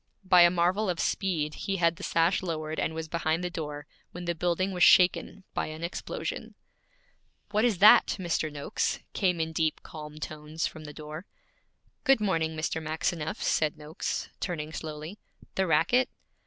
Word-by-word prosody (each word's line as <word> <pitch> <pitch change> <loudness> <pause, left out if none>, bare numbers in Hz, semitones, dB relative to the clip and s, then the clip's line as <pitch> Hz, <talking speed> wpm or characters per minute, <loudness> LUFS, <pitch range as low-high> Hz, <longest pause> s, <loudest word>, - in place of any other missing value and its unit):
By 180 -1 +7
a 175 - +8
marvel 180 +4 +1
of 175 -2 -1
speed 160 -6 0
he 195 - -3
had 170 -1 +2
the - - -10
sash 165 +3 +2
lowered, 155 -3 -3
and 160 - -1
was 160 0 -4
behind 160 +1 -1
the 180 - -2
door, 150 -3 -5 0.3
when 175 0 -7
the 170 - 0
building 175 +3 0
was 180 -1 -4
shaken 185 +2 +5
by - - -1
an 155 +1 -7
explosion. 170 - -5 1.0
'What 215 +2 +2
is 225 -6 +2
that, 210 +4 +7
Mr. 165 -3 -1
Noakes?' 145 -1 -1 0.2
came 180 -4 +1
in 160 0 -1
deep, 160 -1 0
calm 150 -1 -9
tones 155 +1 -4
from 155 -1 -6
the 150 - -7
door. 155 +4 -8 0.8
'Good 270 -3 +5
morning, 165 -6 0
Mr. 160 +1 -2
Maxineff,' 160 0 -2
said 155 -1 +1
Noakes, 150 +1 -4
turning 155 -3 -4
slowly. 155 +5 -6 0.3
'The 190 -1 0
racket? 250 +9 +3
165 Hz, 170 wpm, -28 LUFS, 155-180 Hz, 1.0 s, a